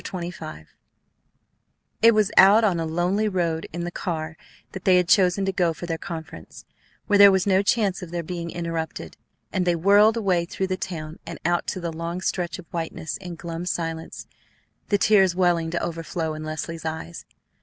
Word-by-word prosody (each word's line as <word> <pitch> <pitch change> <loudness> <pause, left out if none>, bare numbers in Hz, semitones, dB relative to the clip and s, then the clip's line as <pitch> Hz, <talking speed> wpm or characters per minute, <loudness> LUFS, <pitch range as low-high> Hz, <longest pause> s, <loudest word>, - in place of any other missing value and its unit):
CHAPTER 185 - -5
XXV 155 - -9 1.4
It 230 0 +6
was 210 -2 +2
out 205 +4 +7
on 190 -6 +2
a 165 - -2
lonely 180 +6 0
road 170 -4 -1
in 170 +1 -4
the 175 - -4
car 160 -3 -4 0.4
that 190 - -8
they 185 -1 +5
had 180 -1 +2
chosen 190 +1 +3
to 195 - 0
go 175 -3 +1
for 175 - -7
their 165 -1 -3
conference, 165 -4 -9 0.4
where 205 -1 +3
there 200 0 +10
was 190 -1 +1
no 195 -1 +3
chance 200 -2 +1
of 180 - -7
their 170 0 -3
being 170 0 -5
interrupted; 165 -2 -5 0.4
and 185 - +1
they 175 -1 +2
whirled 205 +6 +5
away 185 -6 +1
through 190 +2 -3
the 185 0 -1
town 160 -4 -6
and 170 - -6
out 175 0 +1
to - - -3
the 170 -2 -4
long 170 +2 -4
stretch 180 -2 -2
of 185 - -11
whiteness 165 -1 -4
in 180 -3 -8
glum 170 +1 -6
silence, 165 -2 -4 0.6
the 205 - +3
tears 195 -3 +4
welling 175 -3 +2
to 170 +1 -2
overflow 165 -1 -3
in 155 0 -7
Leslie's 155 +1 -5
eyes. 160 +1 -5
175 Hz, 190 wpm, -24 LUFS, 165-190 Hz, 1.4 s, there